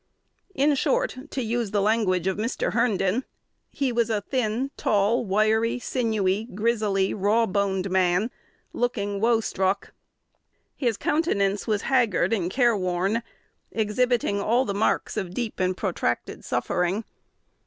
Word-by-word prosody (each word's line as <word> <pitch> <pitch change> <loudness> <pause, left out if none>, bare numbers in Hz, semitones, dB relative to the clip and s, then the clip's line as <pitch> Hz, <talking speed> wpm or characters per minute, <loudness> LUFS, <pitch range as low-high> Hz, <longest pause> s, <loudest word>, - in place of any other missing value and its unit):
In 290 +2 +3
short, - - +1
to 260 - -3
use 230 -1 -1
the 205 - 0
language 200 -4 +1
of 190 -1 +1
Mr. 220 -3 -1
Herndon, 225 -1 +1 0.5
"he 275 -3 -1
was 235 -1 +1
a 215 -2 0
thin, 250 +3 -1
tall, 210 +3 +2
wiry, 220 +3 +2
sinewy, 220 -5 0
grizzly, 210 -3 +1
raw 210 +3 +2
boned 195 -1 0
man," 185 +4 +2 0.4
"looking 205 -5 -1
woe 230 0 +3
struck." 195 -1 -1 0.8
His 235 -6 0
countenance 205 - 0
was 210 -2 0
haggard 230 -8 +2
and 180 -6 0
careworn, 200 -3 +1 0.5
exhibiting 220 -1 +1
all 240 +6 +2
the 200 - -2
marks 205 +2 0
of 185 -2 -3
deep 235 -3 -3
and 185 0 0
protracted - - -2
suffering. 180 +5 -1
215 Hz, 130 wpm, -25 LUFS, 195-235 Hz, 0.8 s, In